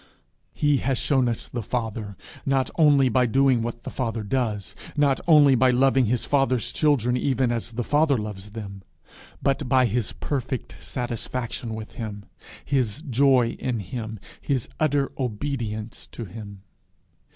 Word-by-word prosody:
He 145 Hz, -1 st, +3 dB
has 135 Hz, -1 st, 0 dB
shown 130 Hz, -3 st, +2 dB
us 115 Hz, -, -3 dB
the 120 Hz, -, -4 dB
Father 110 Hz, -3 st, -4 dB, 0.3 s
not 135 Hz, -1 st, +1 dB
only 145 Hz, -4 st, +5 dB
by 125 Hz, +1 st, +3 dB
doing 130 Hz, 0 st, +3 dB
what 120 Hz, +1 st, -4 dB
the -, -, -6 dB
Father 115 Hz, -3 st, -2 dB
does, 105 Hz, -3 st, -2 dB, 0.2 s
not 140 Hz, -2 st, +3 dB
only 150 Hz, -4 st, +7 dB
by 130 Hz, +1 st, +4 dB
loving 130 Hz, +1 st, +4 dB
his 120 Hz, +2 st, 0 dB
Father's 135 Hz, -5 st, +1 dB
children 130 Hz, -6 st, +2 dB
even 130 Hz, -1 st, +1 dB
as 120 Hz, 0 st, -3 dB
the 120 Hz, +1 st, -2 dB
Father 145 Hz, +1 st, +3 dB
loves 105 Hz, -2 st, -6 dB
them, 100 Hz, -3 st, -7 dB, 0.6 s
but 135 Hz, -1 st, 0 dB
by 130 Hz, -1 st, +5 dB
his 115 Hz, -1 st, -1 dB
perfect 130 Hz, -3 st, -3 dB
satisfaction 120 Hz, -1 st, -4 dB
with 110 Hz, -1 st, -7 dB
him, 105 Hz, -3 st, -6 dB, 0.4 s
his 135 Hz, 0 st, 0 dB
joy 130 Hz, -1 st, +4 dB
in 125 Hz, -3 st, -1 dB
him, 110 Hz, +2 st, -5 dB, 0.2 s
his 135 Hz, -5 st, -1 dB
utter 145 Hz, -3 st, +1 dB
obedience 115 Hz, -3 st, -3 dB
to 115 Hz, -, -7 dB
him. 100 Hz, -1 st, -10 dB
125 Hz, 150 wpm, -25 LUFS, 110-135 Hz, 0.6 s, only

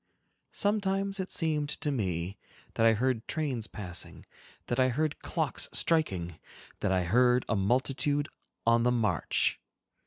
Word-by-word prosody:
Sometimes 200 Hz, -1 st, 0 dB
it 190 Hz, -, -4 dB
seemed 150 Hz, -3 st, +1 dB
to 150 Hz, -, -1 dB
me 95 Hz, -7 st, -2 dB, 0.4 s
that 115 Hz, -, +3 dB
I 115 Hz, -, +6 dB
heard 120 Hz, 0 st, -1 dB
trains 135 Hz, -8 st, -2 dB
passing, 90 Hz, -4 st, -6 dB, 0.4 s
that 120 Hz, -, -2 dB
I 130 Hz, 0 st, +4 dB
heard 150 Hz, +4 st, -1 dB
clocks -, -, -1 dB
striking, 95 Hz, -, +1 dB, 0.4 s
that 100 Hz, -, 0 dB
I 95 Hz, -1 st, +2 dB
heard 125 Hz, +7 st, +3 dB
a 110 Hz, -, +1 dB
multitude 135 Hz, +7 st, +1 dB, 0.4 s
on 115 Hz, 0 st, +4 dB
the 125 Hz, +1 st, +3 dB
march. 110 Hz, -9 st, +1 dB
125 Hz, 135 wpm, -29 LUFS, 105-150 Hz, 0.4 s, I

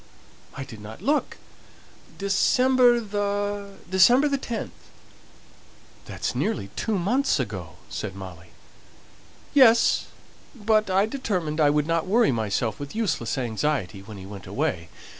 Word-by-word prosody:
"I 135 Hz, -, -5 dB
didn't 110 Hz, -4 st, -11 dB
look. 295 Hz, +2 st, 0 dB, 0.8 s
December 245 Hz, +5 st, +3 dB
the 205 Hz, -1 st, -3 dB
December 215 Hz, +10 st, +5 dB
the 280 Hz, -1 st, 0 dB
10th." 235 Hz, -4 st, -4 dB, 1.3 s
"That's -, -, -4 dB
nearly 100 Hz, -, -2 dB
two 215 Hz, -2 st, -1 dB
months 240 Hz, -, +1 dB
ago," 95 Hz, -9 st, -5 dB
said 105 Hz, -2 st, -5 dB
Molly. 90 Hz, -3 st, -10 dB, 1.1 s
"Yes; 235 Hz, -5 st, +5 dB, 0.5 s
but 215 Hz, -2 st, +1 dB
I 190 Hz, +2 st, +3 dB
determined 185 Hz, -, -2 dB
I 145 Hz, -, +5 dB
wouldn't 155 Hz, +3 st, +1 dB
worry 225 Hz, -, +4 dB
myself 110 Hz, -1 st, -1 dB
with 145 Hz, +4 st, -7 dB
useless 205 Hz, -, -1 dB
anxiety, 115 Hz, -4 st, -2 dB
when 105 Hz, +1 st, -10 dB
he 95 Hz, -, -9 dB
went 100 Hz, -1 st, -10 dB
away. 85 Hz, -1 st, -2 dB
185 Hz, 120 wpm, -25 LUFS, -, 1.3 s, December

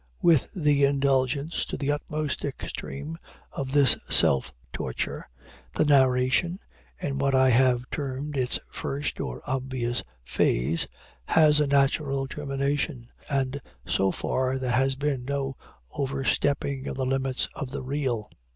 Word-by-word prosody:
With 165 Hz, -6 st, +5 dB
the 150 Hz, -5 st, +3 dB
indulgence, 140 Hz, +2 st, +1 dB
to -, -, -5 dB
the 145 Hz, 0 st, 0 dB
utmost 150 Hz, -1 st, -3 dB
extreme, 145 Hz, +2 st, -5 dB, 0.3 s
of 135 Hz, -2 st, -4 dB
this 140 Hz, -3 st, +6 dB
self 65 Hz, -1 st, +4 dB, 0.2 s
torture, -, -, -4 dB, 0.5 s
the -, -, +3 dB
narration, 130 Hz, +4 st, +3 dB, 0.4 s
in 140 Hz, -1 st, -3 dB
what 135 Hz, -1 st, +2 dB
I 130 Hz, 0 st, +5 dB
have 125 Hz, 0 st, +3 dB
termed 140 Hz, +1 st, -4 dB
its 125 Hz, -2 st, +1 dB
first 140 Hz, +2 st, -3 dB
or 60 Hz, -, -4 dB
obvious 130 Hz, -2 st, -2 dB, 0.2 s
phase, 65 Hz, +4 st, +1 dB, 0.4 s
has 150 Hz, -2 st, +5 dB
a 150 Hz, -, +2 dB
natural 140 Hz, 0 st, +2 dB
termination, 140 Hz, -2 st, -2 dB, 0.2 s
and 135 Hz, -1 st, -1 dB, 0.2 s
so 95 Hz, -, +2 dB
far 130 Hz, 0 st, -1 dB
there 130 Hz, -2 st, -2 dB
has 135 Hz, +2 st, +2 dB
been 140 Hz, -2 st, -1 dB
no 135 Hz, 0 st, -2 dB, 0.4 s
overstepping 135 Hz, 0 st, -1 dB
of -, -, -4 dB
the 130 Hz, -, 0 dB
limits 135 Hz, 0 st, 0 dB
of 135 Hz, -, -5 dB
the 130 Hz, -, -5 dB
real. 130 Hz, -5 st, -2 dB
135 Hz, 135 wpm, -26 LUFS, 130-145 Hz, 0.5 s, this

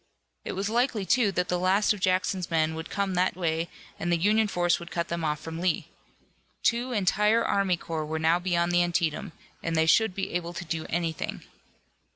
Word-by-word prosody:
It -, -, -4 dB
was 195 Hz, +2 st, -2 dB
likely, 230 Hz, -2 st, +1 dB
too, 225 Hz, -1 st, +3 dB
that 180 Hz, 0 st, 0 dB
the 180 Hz, -, 0 dB
last 190 Hz, +4 st, +3 dB
of 210 Hz, -, -8 dB
Jackson's 185 Hz, 0 st, 0 dB
men 160 Hz, -1 st, +1 dB
would 160 Hz, 0 st, -6 dB
come 200 Hz, -1 st, -1 dB
that 180 Hz, +1 st, +1 dB
way 165 Hz, -2 st, -1 dB, 0.3 s
and 175 Hz, -, -1 dB
the 170 Hz, -, +3 dB
Union 210 Hz, +5 st, +3 dB
force 175 Hz, -3 st, +1 dB
would 170 Hz, -, -9 dB
cut 170 Hz, -1 st, -2 dB
them 170 Hz, -1 st, -3 dB
off 150 Hz, -1 st, 0 dB
from 165 Hz, +1 st, -7 dB
Lee. 180 Hz, -3 st, 0 dB, 0.7 s
Two 240 Hz, +2 st, +1 dB
entire 210 Hz, +1 st, +2 dB
army 195 Hz, -3 st, +1 dB
corps 160 Hz, -2 st, -4 dB
were 160 Hz, +1 st, -2 dB
now 160 Hz, +2 st, +3 dB
beyond 175 Hz, -1 st, +1 dB
the 175 Hz, 0 st, +4 dB
Antietam, 170 Hz, -3 st, 0 dB, 0.3 s
and 165 Hz, -1 st, -2 dB
they 160 Hz, 0 st, +3 dB
should 210 Hz, +3 st, +4 dB
be 195 Hz, -, -3 dB
able 175 Hz, -1 st, -2 dB
to 175 Hz, -, -6 dB
do 160 Hz, 0 st, -3 dB
anything. 165 Hz, -1 st, -3 dB
175 Hz, 200 wpm, -27 LUFS, 165-195 Hz, 0.7 s, the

